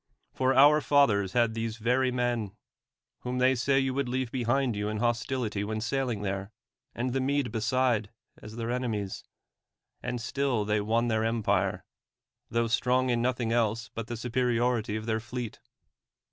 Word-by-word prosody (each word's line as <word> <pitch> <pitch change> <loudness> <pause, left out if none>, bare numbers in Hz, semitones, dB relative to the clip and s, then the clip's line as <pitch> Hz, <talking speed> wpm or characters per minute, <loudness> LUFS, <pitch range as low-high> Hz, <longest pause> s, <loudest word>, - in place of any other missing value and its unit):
For 130 0 +1
our 145 +3 +7
fathers 110 -11 +3
had 115 -2 +2
these 115 0 -3
\'cry 125 +3 +2
men, 120 -5 -1 0.6
whom 125 0 -4
they 130 +1 +4
say 135 +2 +1
you 135 -1 +1
would 135 -2 -1
leave 130 -1 -2
behind 125 0 +1
3'ou 105 0 -2
in 110 - -3
hostility 120 -2 -1
when 110 +1 -3
sailing 120 -2 -1
there, 100 0 -3 0.4
and 125 +1 -2
the 135 - +1
]\Iede 135 -2 0
beside, 115 -1 +1 0.3
as 105 +1 -10
their 115 0 -3
enemies; 110 -6 -3 0.8
and 125 - -3
still 125 -2 -1
they 105 0 +1
won 115 +3 +1
their 110 -1 +1
empire; 115 -1 0 0.6
tho 115 0 +1
strong 125 +2 +2
in 120 -1 +1
nothing 120 -2 0
else 115 -1 0
but 115 -1 -5
the 120 - -4
superiority 120 -2 0
of 110 0 -4
their 110 -1 0
fleet. 120 0 -6
120 Hz, 160 wpm, -28 LUFS, 110-130 Hz, 0.8 s, our